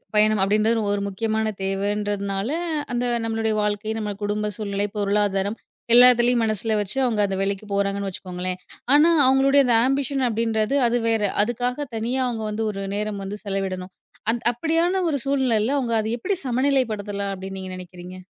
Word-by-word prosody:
பயணம் 215 -1 +4
அப்டின்றது 215 +3 +2
ஒரு 205 0 -1
முக்கியமான 220 +2 -1
தேவன்றதுனால, 200 +1 -2 0.4
அந்த 245 0 0 0.2
நம்மளுடைய 225 -1 -1
வாழ்க்கை, 210 +1 -1
நம்ம 210 -1 -3
குடும்ப 210 +1 -1
சூழ்நிலை, 200 -1 -2
பொருளாதாரம், 205 0 0 0.4
எல்லாத்துலையும் 245 -1 +6
மனசுல 220 0 -1
வச்சு 205 +5 -2
அவங்க 230 -4 0
அந்த 195 -1 -2
வேலைக்கு 195 +1 -2
போறாங்கன்னு 200 0 -1
வச்சுக்கோங்களேன். 180 0 -5 0.4
ஆனா, 310 +3 +6 0.2
அவங்களுடைய 270 +1 +4
அந்த 240 - +4
ஆம்பிஷன் 270 0 0
அப்டின்றது 225 +2 0
அது 240 +1 +1
வேற, 225 -1 +1 0.2
அதுக்காக 245 +5 -2
தனியா 240 +4 -1
அவங்க 225 -2 -4
வந்து 220 +1 -2
ஒரு 195 -1 -5
நேரம் 210 -1 -3
வந்து 200 +2 -5
செலவிடணும். 190 -2 -3 0.4
அந் 235 0 -3
அப்டியான 330 +8 +1
ஒரு 290 - 0
சூழ்நிலைல 260 -3 +1
அவங்க 240 -3 -2
அத 215 - -2
எப்டி 390 - -1
சமநிலைப்படுத்தலாம் 225 -6 0
அப்டின்னு 190 0 -7
நீங்க 190 0 -6
நெனைக்கிறீங்க? 180 0 -10
215 Hz, 150 wpm, -23 LUFS, 200-240 Hz, 0.4 s, எல்லாத்துலையும்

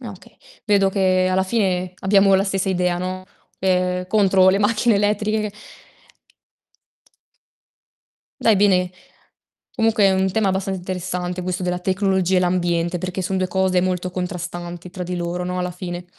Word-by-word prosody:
No, 235 -3 -7
okay, 190 - -17 0.3
vedo 200 -2 +3
che 185 -1 +2
alla 190 +1 +2
fine 185 -3 -1
abbiamo 195 0 +4
la 190 +1 +3
stessa 195 -1 -1
idea, 180 -1 0
no, 185 +1 -4 0.3
ehm, 180 -1 0
contro 195 -3 +4
le 190 +1 +3
macchine 215 +2 +2
elettriche. 210 +1 0 2.9
Dai 225 - +4
bene, 185 -2 +3 0.8
comunque 225 -4 +3
è 195 - +5
un 190 0 +1
tema 205 0 +1
abbastanza 190 0 -2
interessante 180 0 -4
questo 180 0 -3
della 180 0 -1
tecnologia 190 0 +1
e - - +5
l'ambiente, 175 -1 0
perché 185 +2 -4
son 190 +1 -2
2 185 0 0
cose 185 0 +1
molto 180 0 -1
contrastanti 175 -1 -5
tra 180 0 -6
di 180 +1 -4
loro, 175 +1 -3
no, 180 0 -3
alla 180 0 -2
fine. 175 0 -6
185 Hz, 150 wpm, -21 LUFS, 180-195 Hz, 2.9 s, è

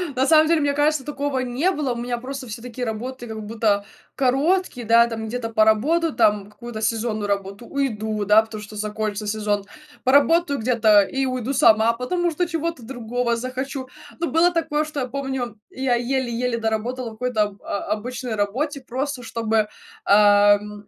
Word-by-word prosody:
на 260 +1 +2
самом, 315 0 +6
деле, 325 -1 +3
мне 285 0 +1
кажется, 290 -1 +1
такого 285 -2 -2
не 255 +8 0
было. 290 -7 -1
У - - -6
меня 240 0 -3
просто 260 +2 -7
все 225 +1 -7
такие 245 0 -5
работы 240 +3 -5
как 220 -1 -6
будто 210 -2 0 0.3
короткие, 275 +2 +1
да, 230 +1 +6
там 225 -1 -5
где-то 230 0 -4
поработаю, 235 +10 +3
там 210 -3 +2
какую-то 220 +1 -8
сезонную 220 -1 -1
работу- 200 +3 -3
уйду, 220 -6 -2
да, 210 +2 +6
потому 220 -1 -8
что 210 +1 -11
закончится 210 0 -3
сезон, 210 -1 -1 0.4
поработаю 285 +3 +3
где-то 220 -3 +4
и 270 +6 -2
уйду 255 +1 -2
сама, 230 -4 +5
потому 345 +9 -1
что 350 +3 -1
чего-то 330 -3 -3
другого 240 0 -2
захочу, 260 +2 -4 0.3
но 340 - 0
было 335 +2 +3
такое, 310 -3 0
что, 300 -2 -4
я 255 - -2
помню, 265 -4 -4
я 260 -1 -1
еле-еле 245 -1 -1
доработала 230 +2 -2
в - - -11
какой-то 225 -1 0
об 205 -1 -6
о 200 - -3
обычной 245 +2 -3
работе, 260 +8 -2
просто 260 +1 -4
чтобы, 225 -2 0 0.4
ам 205 0 +4
240 Hz, 170 wpm, -22 LUFS, 215-270 Hz, 0.4 s, самом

